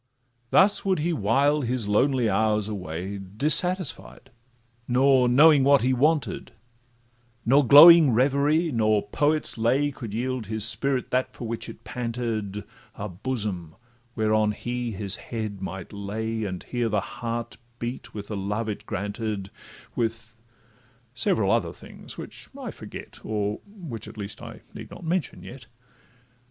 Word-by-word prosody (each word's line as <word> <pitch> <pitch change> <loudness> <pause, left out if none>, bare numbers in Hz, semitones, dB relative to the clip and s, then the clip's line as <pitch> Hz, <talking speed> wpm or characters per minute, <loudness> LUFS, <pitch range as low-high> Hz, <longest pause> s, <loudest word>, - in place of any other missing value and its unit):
Thus 195 - +4
would 190 -1 +1
he 165 +3 0
while 140 +5 +2
his 120 -3 -1
lonely 125 +3 +2
hours 105 0 +1
away 95 -1 -5
Dissatisfied, 150 - -1 0.6
nor 130 0 +4
knowing 145 +2 +6
what 140 -2 +5
he 130 +1 +2
wanted; 150 +4 0 0.9
Nor 135 +2 +4
glowing 155 +1 +10
reverie, 140 +7 +2
nor 110 -4 +1
poet's 150 +2 0
lay, 135 +6 +2
Could 120 -5 -8
yield 125 0 -3
his 110 0 0
spirit 130 +3 +1
that 130 0 0
for 120 - -6
which 115 0 -5
it - - -11
panted, 115 -4 -4 0.3
A 105 - -5
bosom 95 -5 -4 0.4
whereon 110 -1 +2
he 120 +2 -4
his 100 -2 -2
head 110 -4 -5
might 95 0 -6
lay, 110 +2 -3
And 90 -3 -5
hear 120 -2 -2
the 105 -1 +1 0.2
heart 115 0 -4 0.2
beat 120 0 -6
with 105 -2 -8
the 105 - -3
love 105 +3 -2
it 105 - -5
granted, 100 0 -4 0.4
With—several 115 0 -4
other - - +1
things, - - -11
which - - -5
I - - -6
forget, - - -10
Or 105 -1 -2
which, 165 - -8
at - - -11
least, 100 0 -6
I - - -10
need - - -9
not - - -11
mention 170 0 -2
yet. 120 -3 -11
115 Hz, 140 wpm, -25 LUFS, 105-135 Hz, 0.9 s, glowing